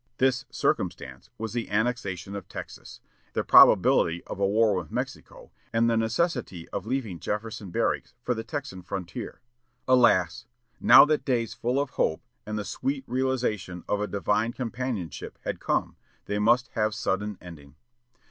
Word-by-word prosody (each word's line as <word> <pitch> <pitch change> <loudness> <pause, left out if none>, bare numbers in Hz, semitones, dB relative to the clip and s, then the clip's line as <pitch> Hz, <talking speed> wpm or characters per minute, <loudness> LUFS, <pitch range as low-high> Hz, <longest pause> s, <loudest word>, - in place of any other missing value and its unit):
This 130 +2 +2
"circumstance" 65 0 -2
was 110 0 -5
the 120 -1 -3
annexation 100 -4 -1
of 100 - -7
Texas, - - -9 0.3
the - - 0
probability 85 +1 +6
of - - -7
a 100 - +3
war 110 +1 +3
with 90 -5 -3
Mexico, - - -6 0.2
and 115 +1 +2
the 115 - +2
necessity 115 - -1
of - - -5
leaving 115 -9 -2
Jefferson 105 +1 -4
Barracks 85 - -1
for 125 - +1
the 115 -1 -5
Texan 140 -6 -6
frontier. 90 -1 -6 0.5
Alas! 120 -8 +3 0.3
now - - +9
that 150 0 +1
days 120 -4 0
full 125 +3 -1
of 140 -2 -2
hope, 80 - 0 0.2
and 105 0 -3
the 105 - -3
sweet 135 +5 -2
realization 125 -9 -1
of 105 - 0
a 105 - -1
divine 105 +4 0
companionship 120 - -4
had - - -3
come, - - -1 0.3
they 105 0 -2
must 120 +5 +3
have 110 -2 -1
sudden 105 0 -2
ending. 75 -5 -12
110 Hz, 155 wpm, -27 LUFS, 95-125 Hz, 0.5 s, now